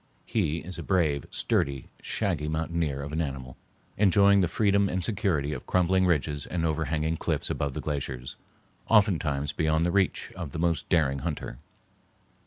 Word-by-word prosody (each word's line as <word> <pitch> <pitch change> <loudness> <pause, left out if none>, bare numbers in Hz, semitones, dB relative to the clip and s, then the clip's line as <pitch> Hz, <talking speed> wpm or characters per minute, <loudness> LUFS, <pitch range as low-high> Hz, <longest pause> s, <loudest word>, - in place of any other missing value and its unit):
He 85 -8 0
is 90 +3 -6
a - - -3
brave, 80 -8 +1
sturdy 70 -2 0 0.2
shaggy 90 -9 -1
mountaineer 80 -2 -1
of 75 - -6
an 80 +2 -1
animal, 65 -4 -5 0.4
enjoying 100 0 +5
the 90 - +2
freedom 100 +1 +2
and 90 0 -1
security 80 -8 0
of 65 - -7
crumbling 95 +1 +3
ridges 75 -3 0
and 85 -2 -1
overhanging 80 0 0
cliffs - - -2
above 70 -2 -2
the - - -3
glaciers, 65 -4 -4 0.5
oftentimes 80 -10 +2
beyond 80 +1 +1
the 85 - +1
reach 100 -1 +1
of 85 -8 -6
the - - -4
most 85 -1 0
daring 70 -5 +2
hunter. - - -5
80 Hz, 160 wpm, -27 LUFS, 70-90 Hz, 0.5 s, enjoying